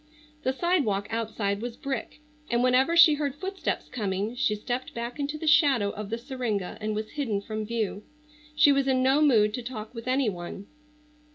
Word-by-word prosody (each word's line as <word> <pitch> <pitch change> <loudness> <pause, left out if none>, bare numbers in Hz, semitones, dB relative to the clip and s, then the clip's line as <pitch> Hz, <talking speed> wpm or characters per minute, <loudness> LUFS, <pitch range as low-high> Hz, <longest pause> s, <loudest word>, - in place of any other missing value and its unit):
The 260 - +1
sidewalk 265 - +1
outside 215 -3 -2
was 240 0 -5
brick, 275 +2 -5 0.3
and 240 +1 +2
whenever 260 +6 +3
she 320 -2 +9
heard 290 -2 -2
footsteps 380 +5 -3
coming 205 -1 -2
she 245 -4 +1
stepped 245 +4 -4
back 235 +3 -5
into 290 +2 -2
the 320 - -6
shadow 280 -10 +4
of 210 -1 -7
the 230 - -2
syringa 235 -7 -3
and 215 0 -2
was 215 0 -4
hidden 255 -9 -1
from 215 +1 -5
view. 220 -3 -2 0.5
She 300 -1 +6
was 275 -1 +2
in 260 -1 +2
no 270 +3 +4
mood 220 -8 +4
to 250 - -3
talk 230 -2 -7
with 230 0 -8
any 260 0 +2
one. 185 0 -5
245 Hz, 185 wpm, -27 LUFS, 215-275 Hz, 0.5 s, she